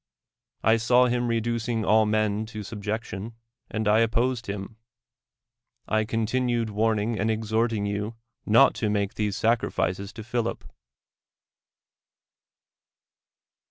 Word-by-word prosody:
I 110 +1 +5
saw 125 +2 +4
him 120 0 0
re 115 -1 +1
ducing 115 0 -2
all 110 0 +4
men 110 0 0
to 110 -2 -7
subjection, 110 +1 -5 0.3
and 110 -1 -2
I 105 +1 +5
opposed 120 +1 +1
him; 100 +2 -6 1.1
I 110 0 +1
continued 115 +1 0
warning 110 +1 0
and 110 +3 +1
exhorting 110 0 0
you 105 +2 -3 0.3
not 115 +6 +5
to 110 - +1
make 100 -1 0
these 105 -2 -1
sacrifices 100 -4 0
to 110 - -8
l^'hilip. 120 0 -2
110 Hz, 115 wpm, -26 LUFS, 105-115 Hz, 1.1 s, I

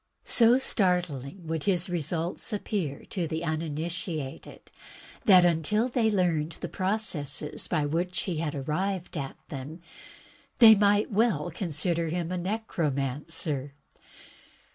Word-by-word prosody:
So 235 +1 +6
startling 180 - -1
would 160 -1 -3
his 180 -3 +2
results 170 +3 -1
app>ear 195 -8 -3
to 175 -4 -2
the 160 +2 -3
uninitiated 160 -2 -5 0.5
that, 185 -3 +7
until 175 - +2
they 235 -3 +2
learned 170 -6 +1
the - - -6
processes 185 -8 -2
by 155 -4 0
which 175 +5 -1
he 180 -4 -3
had 155 -1 -2
arrived 180 +7 -2
at 140 -3 -5
them, 145 +4 -7 0.8
they 225 -3 +10
might 205 +1 +3
well 195 -7 +1
consider 170 0 -1
him 170 +1 -2
a 185 - -1
necromancer. 150 - -2
170 Hz, 120 wpm, -28 LUFS, 150-195 Hz, 0.8 s, they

